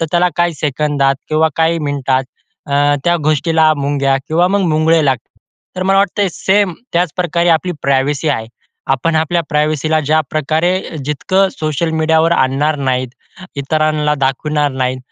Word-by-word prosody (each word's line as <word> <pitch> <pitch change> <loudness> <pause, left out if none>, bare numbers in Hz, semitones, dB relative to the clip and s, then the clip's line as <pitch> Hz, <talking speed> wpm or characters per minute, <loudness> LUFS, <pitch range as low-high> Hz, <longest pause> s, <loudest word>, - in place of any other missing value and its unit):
तर - - +1
त्याला 175 +1 +3
काही 175 -1 +1
सेकंदात 145 -1 0
किंवा 155 +1 +2
काही 165 +1 +2
मिनिटात 135 -3 -1 0.5
अ, 145 +1 +3
त्या 175 0 +3
गोष्टीला 155 +1 +3
मुंग्या 140 -1 0
किंवा 170 +3 +2
मग 200 +1 +1
मुंगळे 155 +1 +3
लागता. 130 -4 -1 0.5
तर 185 - -2
मला 195 +1 +2
वाटतं 200 +1 +1
सेम 195 +1 +1 0.2
त्याचप्रकारे 175 0 0
आपली 170 +2 +2
प्रायव्हसी 140 +3 0
आहे. 115 -6 -1 0.4
आपण 145 +5 +1
आपल्या 160 +2 +1
प्रायव्हसीला 155 0 0
ज्याप्रकारे 155 +4 -1
जितकं 185 +7 +1
सोशल 155 +1 -1
मीडियावर 160 +1 +2
आणणार 145 +1 +1
नाहीत, 130 -2 -1 0.5
इतरांना 150 +1 0
दाखवणार 145 +2 0
नाहीत. 130 0 -2
155 Hz, 140 wpm, -15 LUFS, 140-165 Hz, 0.5 s, त्याला